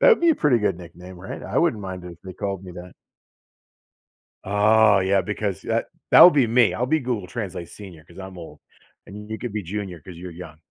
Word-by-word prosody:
That'd 480 Hz, -6 st, +6 dB
be 340 Hz, -, +4 dB
a 320 Hz, -, +3 dB
pretty 140 Hz, -, +2 dB
good 95 Hz, -5 st, -1 dB
nickname, 90 Hz, +1 st, -12 dB
right? 95 Hz, -, -8 dB
I -, -, -2 dB
wouldn't 105 Hz, -2 st, +1 dB
mind 95 Hz, -1 st, -7 dB
it 90 Hz, -, -8 dB
if 85 Hz, -, -16 dB
they 95 Hz, -, -9 dB
called 95 Hz, 0 st, -5 dB
me 90 Hz, -, -9 dB
that. 90 Hz, 0 st, -11 dB, 1.5 s
Oh, 105 Hz, +1 st, +4 dB
yeah, 95 Hz, 0 st, +2 dB
because 105 Hz, -3 st, -4 dB
that -, -, -1 dB, 0.3 s
that -, -, +8 dB
would 180 Hz, -, +10 dB
be 135 Hz, -5 st, +3 dB
me, 115 Hz, 0 st, +3 dB
I'll 125 Hz, -, -1 dB
be 155 Hz, +4 st, +1 dB
Google 120 Hz, -8 st, -3 dB
Translate 95 Hz, -6 st, -6 dB
senior, 90 Hz, -7 st, -12 dB
'cause 85 Hz, +2 st, -15 dB
I'm 95 Hz, -1 st, -9 dB
old, 75 Hz, -4 st, -11 dB, 0.5 s
and 105 Hz, +2 st, -10 dB
you 110 Hz, -, -4 dB
could 120 Hz, -4 st, -6 dB
be 105 Hz, -, -3 dB
junior 95 Hz, -1 st, -6 dB
'cause 90 Hz, +1 st, -11 dB
you're 90 Hz, 0 st, -8 dB
young. 85 Hz, -2 st, -11 dB
95 Hz, 225 wpm, -23 LUFS, 90-110 Hz, 1.5 s, would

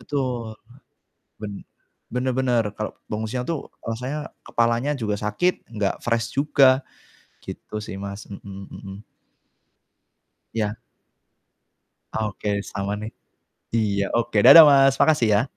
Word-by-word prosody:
Betul. 125 Hz, -6 st, -3 dB, 0.9 s
Ben 105 Hz, -1 st, -5 dB, 0.6 s
bener 125 Hz, +1 st, -1 dB
bener, 125 Hz, -2 st, +1 dB
kalau 110 Hz, +1 st, -5 dB
bangun 110 Hz, +1 st, -4 dB
siang 125 Hz, +2 st, -3 dB
tuh 160 Hz, +1 st, -4 dB, 0.2 s
rasanya 125 Hz, +7 st, -4 dB
kepalanya 120 Hz, +5 st, 0 dB
juga 110 Hz, -5 st, -2 dB
sakit, 110 Hz, -, -1 dB
enggak 105 Hz, -4 st, -2 dB
fresh 115 Hz, -1 st, -1 dB
juga, 135 Hz, -2 st, +4 dB, 0.6 s
gitu 105 Hz, -, -8 dB
sih, 105 Hz, -, -7 dB
Mas, 100 Hz, +1 st, -7 dB
mhm 100 Hz, -1 st, -9 dB
mhm. 95 Hz, 0 st, -10 dB, 1.6 s
Ya. 105 Hz, -1 st, -1 dB, 1.4 s
Oke, 105 Hz, -1 st, -2 dB
sama 100 Hz, 0 st, -4 dB
nih. 110 Hz, -, -5 dB, 0.6 s
Iya, 105 Hz, -3 st, +1 dB
oke, 115 Hz, -2 st, -1 dB
dadah 145 Hz, +6 st, +12 dB
Mas, 135 Hz, -1 st, +5 dB
makasih 150 Hz, -7 st, +4 dB
ya. 105 Hz, +3 st, +3 dB
115 Hz, 115 wpm, -23 LUFS, 105-130 Hz, 1.6 s, dadah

